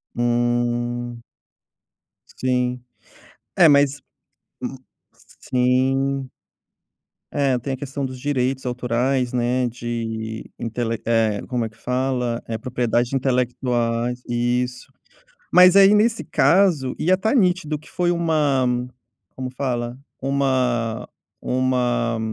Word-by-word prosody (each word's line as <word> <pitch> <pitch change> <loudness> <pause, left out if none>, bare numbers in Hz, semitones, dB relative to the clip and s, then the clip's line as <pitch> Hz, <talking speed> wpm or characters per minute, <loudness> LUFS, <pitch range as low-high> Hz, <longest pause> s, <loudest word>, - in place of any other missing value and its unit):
Hum. 120 0 -1 1.2
Sim. 125 -1 -1 0.7
É 175 - +7
mas 140 -1 +3 0.6
Hum. - - -4 0.6
Sim. 130 +1 +1 1.0
É. 140 -3 +1
Tem 135 +3 -4
a - - -4
questão 140 +1 -4
dos 130 -1 -7
direitos 130 -1 -1
autorais, 125 +1 0
né, 125 +1 +1
de 115 -2 -5
intelec 115 -1 -3
Eh, 110 -3 +1
como 125 -2 -1
é - - -5
que 110 - -24
fala? 125 -1 -1
É, 115 - -3
propriedade 120 +1 -1
intelectual 125 -2 0 0.2
e 120 +1 +1
Isso. 125 0 -8 0.6
Mas 180 +1 +8
aí, 200 +1 +8
nesse 225 +2 +2
caso, 170 -9 +3
ia 185 +3 +2
tá 220 +6 0
nítido 180 - +2
que 150 - -17
foi 175 -1 +1
uma 155 -6 +1 0.7
Como 130 -1 -4
fala? 125 -2 -3 0.2
Uma 130 -4 0 0.3
uma 125 -2 0
125 Hz, 110 wpm, -22 LUFS, 120-135 Hz, 1.2 s, Mas